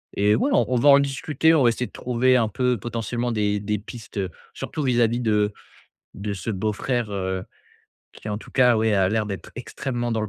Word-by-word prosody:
et 105 Hz, +1 st, +3 dB
ouais 280 Hz, +2 st, +1 dB
on -, -, +4 dB
on -, -, +2 dB
va 145 Hz, +5 st, +4 dB
en 140 Hz, 0 st, +8 dB
discuter, 145 Hz, +3 st, +1 dB
on 140 Hz, -, +4 dB
va 120 Hz, -, +6 dB
essayer 125 Hz, +1 st, -2 dB
de -, -, -20 dB
trouver 125 Hz, +1 st, +2 dB
un 110 Hz, -3 st, +1 dB
peu 125 Hz, +3 st, 0 dB
potentiellement 120 Hz, +2 st, -3 dB
des 105 Hz, -2 st, 0 dB
des 105 Hz, 0 st, -2 dB
pistes, 115 Hz, 0 st, -10 dB
heu, 95 Hz, -2 st, -1 dB, 0.2 s
surtout 155 Hz, -2 st, -5 dB
vis-à-vis 120 Hz, -2 st, +2 dB
de 105 Hz, -2 st, +2 dB, 0.6 s
de 100 Hz, +1 st, -4 dB
ce 95 Hz, +4 st, -5 dB
beau-frère, 110 Hz, +3 st, -1 dB
heu, 95 Hz, -1 st, -3 dB, 0.7 s
qui 105 Hz, -, -10 dB
en 105 Hz, 0 st, -2 dB
tout -, -, -14 dB
cas, 125 Hz, -3 st, +5 dB
ouais, 110 Hz, 0 st, +2 dB
a 95 Hz, -2 st, +3 dB
l'air 110 Hz, 0 st, 0 dB
d'être 100 Hz, -2 st, -6 dB
extrêmement 120 Hz, -1 st, -3 dB
dans 110 Hz, -, 0 dB
le 105 Hz, -, -3 dB
115 Hz, 215 wpm, -23 LUFS, 105-125 Hz, 0.7 s, en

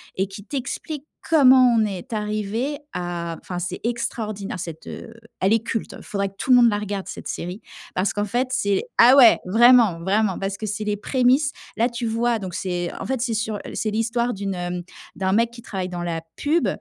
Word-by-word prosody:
et 190 Hz, +1 st, 0 dB
qui 195 Hz, +1 st, -10 dB
t'explique 280 Hz, +3 st, -5 dB, 0.2 s
comment 260 Hz, -5 st, +6 dB
on 220 Hz, -1 st, +3 dB
est 205 Hz, +4 st, -6 dB
arrivés 215 Hz, +6 st, -2 dB
à 175 Hz, -2 st, -4 dB
enfin 180 Hz, -, -6 dB
c'est 180 Hz, +1 st, -4 dB
extraordinaire 215 Hz, -5 st, -3 dB
cette, 165 Hz, -2 st, -7 dB
heu 230 Hz, -, -8 dB, 0.3 s
elle 195 Hz, +3 st, +3 dB
est 225 Hz, -1 st, +2 dB
culte. 230 Hz, -4 st, -3 dB
Faudrait 200 Hz, -1 st, -2 dB
que -, -, -24 dB
tout -, -, -5 dB
le 250 Hz, -, +9 dB
monde 240 Hz, -1 st, +6 dB
la 205 Hz, -, 0 dB
regarde 205 Hz, -2 st, -4 dB
cette -, -, -7 dB
série, 180 Hz, +4 st, -5 dB, 0.3 s
parce 185 Hz, +2 st, +1 dB
qu'en 205 Hz, 0 st, -1 dB
fait 245 Hz, +5 st, -1 dB
c'est 200 Hz, -5 st, +1 dB
ah 245 Hz, +3 st, +8 dB
ouais 255 Hz, -5 st, +8 dB
vraiment, 225 Hz, -3 st, +5 dB
vraiment 195 Hz, +2 st, +1 dB
parce 195 Hz, 0 st, -3 dB
que 215 Hz, -, -5 dB
c'est 210 Hz, +1 st, -3 dB
les 210 Hz, -1 st, -1 dB
prémices. 260 Hz, +6 st, +2 dB, 0.3 s
Là, 230 Hz, +2 st, +3 dB
tu 235 Hz, 0 st, -4 dB
vois, 230 Hz, +1 st, +1 dB
donc, 190 Hz, -3 st, -6 dB
c'est, 175 Hz, -1 st, -2 dB
en -, -, -5 dB
fait, 265 Hz, -2 st, -2 dB
c'est 240 Hz, -2 st, 0 dB
sur 220 Hz, -1 st, -1 dB, 0.2 s
c'est 220 Hz, -, -1 dB
l'histoire 235 Hz, +2 st, 0 dB
d'une, 195 Hz, 0 st, -3 dB
hem 175 Hz, 0 st, -4 dB, 0.3 s
d'un 190 Hz, 0 st, -1 dB
mec 230 Hz, +2 st, +2 dB
qui 235 Hz, 0 st, -11 dB
travaille 190 Hz, -5 st, -4 dB
dans 175 Hz, -1 st, -4 dB
la 165 Hz, -1 st, -3 dB
pub 315 Hz, +4 st, +1 dB
215 Hz, 205 wpm, -23 LUFS, 190-240 Hz, 0.3 s, le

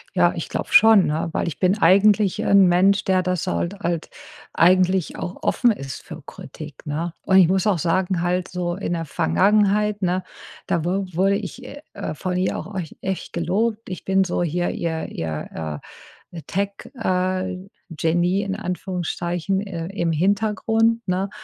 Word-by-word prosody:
Ja, -, -, +4 dB
ich -, -, -4 dB
glaube -, -, -4 dB
schon, 220 Hz, -4 st, +7 dB
ne? 155 Hz, +3 st, -1 dB
Weil -, -, -1 dB
ich 165 Hz, -, -4 dB
bin 190 Hz, +3 st, +2 dB
eigentlich 200 Hz, 0 st, +4 dB
'n 195 Hz, -2 st, +6 dB
Mensch, 190 Hz, +3 st, +3 dB
der 185 Hz, -2 st, +2 dB
das 180 Hz, 0 st, -2 dB
hal 175 Hz, -, -1 dB
halt 170 Hz, -3 st, -2 dB, 0.4 s
eigentlich 185 Hz, +1 st, +3 dB
auch 180 Hz, -, -6 dB
offen 245 Hz, -, +3 dB
ist 135 Hz, -10 st, -6 dB
für 165 Hz, -3 st, -10 dB
Kritik, 150 Hz, +1 st, -11 dB
ne? 160 Hz, +3 st, -3 dB
Und 190 Hz, -, +4 dB
ich 185 Hz, -, +7 dB
muss 190 Hz, +1 st, +1 dB
auch 195 Hz, -6 st, +2 dB
sagen 180 Hz, +2 st, 0 dB
halt 180 Hz, +1 st, 0 dB
so 175 Hz, -1 st, -3 dB
in 190 Hz, -2 st, -3 dB
der 165 Hz, -1 st, -3 dB
Vergangenheit, 205 Hz, -, +2 dB
ne, 180 Hz, +1 st, 0 dB, 0.4 s
da 170 Hz, -1 st, 0 dB
wu 190 Hz, +2 st, 0 dB
wurde 195 Hz, +4 st, +2 dB
ich, 210 Hz, +5 st, -6 dB
äh, 285 Hz, +3 st, -10 dB
äh, 200 Hz, -4 st, -4 dB
von 180 Hz, +4 st, -3 dB
ihr 185 Hz, -, 0 dB
auch 200 Hz, -, -9 dB
ech 175 Hz, -5 st, -5 dB
echt 190 Hz, -1 st, -4 dB
gelobt. 210 Hz, +7 st, -1 dB
Ich 185 Hz, -, -7 dB
bin 190 Hz, 0 st, +3 dB
so 175 Hz, -1 st, -1 dB
hier 175 Hz, +2 st, -1 dB
ihr, 160 Hz, -1 st, -3 dB
ihr, 80 Hz, -1 st, -5 dB, 0.5 s
äh, 170 Hz, -, -8 dB
Tech, 200 Hz, +1 st, -1 dB, 0.3 s
äh, 185 Hz, -3 st, -1 dB, 0.3 s
Genie 175 Hz, +4 st, +1 dB
in 195 Hz, 0 st, -3 dB
Anführungszeichen, 180 Hz, -1 st, -3 dB
äh, 175 Hz, -5 st, -5 dB
im 170 Hz, -4 st, -1 dB
Hintergrund, 220 Hz, +6 st, +1 dB
ne? 185 Hz, +2 st, -1 dB
185 Hz, 170 wpm, -22 LUFS, 170-200 Hz, 0.5 s, schon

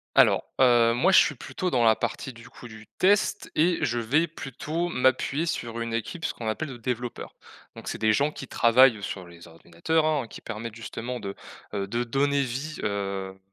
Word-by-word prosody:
Alors, -, -, +5 dB, 0.2 s
heu, 120 Hz, -2 st, +5 dB
moi 185 Hz, +11 st, +3 dB
je -, -, +8 dB
suis 145 Hz, -, +4 dB
plutôt 130 Hz, +9 st, -4 dB
dans 120 Hz, -2 st, +2 dB
la 110 Hz, -, +6 dB
partie 130 Hz, -, -4 dB
du 115 Hz, 0 st, -14 dB
coup -, -, -13 dB
du 110 Hz, -1 st, -12 dB
test 200 Hz, +2 st, +2 dB
et 170 Hz, +2 st, +3 dB
je 120 Hz, -5 st, 0 dB
vais 145 Hz, +9 st, +2 dB
plutôt 155 Hz, +3 st, -4 dB
m'appuyer 130 Hz, +2 st, +1 dB
sur 115 Hz, -7 st, -3 dB
une 115 Hz, 0 st, -3 dB
équipe, 160 Hz, -, -4 dB
ce -, -, -1 dB
qu'on 115 Hz, -2 st, -5 dB
appelle 155 Hz, +8 st, -2 dB
de 125 Hz, -, -7 dB
développeurs. 120 Hz, 0 st, -5 dB, 0.4 s
Donc -, -, -8 dB
c'est -, -, -4 dB
des 110 Hz, 0 st, +3 dB
gens 145 Hz, +5 st, +1 dB
qui 135 Hz, -, -9 dB
travaillent 115 Hz, -2 st, +5 dB
sur 95 Hz, -2 st, -5 dB
les 85 Hz, 0 st, -14 dB
ordinateurs, 85 Hz, -, -1 dB
hein, 145 Hz, -6 st, 0 dB
qui -, -, -11 dB
permettent 110 Hz, 0 st, -6 dB
justement 115 Hz, +1 st, -6 dB
de, 100 Hz, -1 st, -5 dB, 0.4 s
heu 100 Hz, -1 st, -2 dB
de 120 Hz, +4 st, -2 dB
donner 140 Hz, +3 st, +1 dB
vie, 135 Hz, +5 st, -4 dB
heu, 100 Hz, -2 st, -3 dB
120 Hz, 200 wpm, -26 LUFS, 110-145 Hz, 0.4 s, je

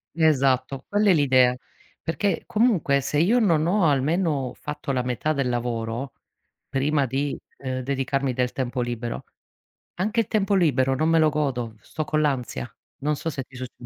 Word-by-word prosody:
Esatto, 135 Hz, -4 st, +2 dB
quella 205 Hz, 0 st, +3 dB
è -, -, +6 dB
l'idea. 130 Hz, -4 st, +4 dB, 0.5 s
Perché, 170 Hz, +2 st, -1 dB
comunque, 205 Hz, -, +2 dB
se 145 Hz, -, -2 dB
io 220 Hz, +9 st, +4 dB
non 165 Hz, -8 st, +3 dB
ho 185 Hz, 0 st, +2 dB
almeno 145 Hz, -1 st, +1 dB
fatto 150 Hz, -1 st, -4 dB
la 125 Hz, -2 st, 0 dB
metà 125 Hz, +5 st, -1 dB
del 140 Hz, -3 st, 0 dB
lavoro, 120 Hz, +1 st, -2 dB, 0.6 s
prima 140 Hz, +1 st, +1 dB
di, 135 Hz, +3 st, -2 dB, 0.2 s
uhm, 130 Hz, -1 st, -3 dB
dedicarmi 135 Hz, 0 st, -1 dB
del 125 Hz, 0 st, 0 dB
tempo 125 Hz, -1 st, -2 dB
libero, 120 Hz, -1 st, -4 dB, 0.7 s
anche 215 Hz, +5 st, +1 dB
il 215 Hz, -, -5 dB
tempo 205 Hz, -1 st, +1 dB
libero 135 Hz, -7 st, +3 dB
non 155 Hz, +4 st, +1 dB
me 165 Hz, 0 st, +4 dB
lo 155 Hz, -1 st, +5 dB
godo, 130 Hz, -7 st, -2 dB
sto 155 Hz, -, -4 dB
con 155 Hz, +1 st, 0 dB
l'ansia. 125 Hz, -, -1 dB, 0.3 s
Non 150 Hz, +2 st, -1 dB
so 165 Hz, -, -3 dB
se 135 Hz, -3 st, -4 dB
ti 130 Hz, -, -19 dB
succ 125 Hz, 0 st, -6 dB
140 Hz, 170 wpm, -24 LUFS, 130-160 Hz, 0.7 s, è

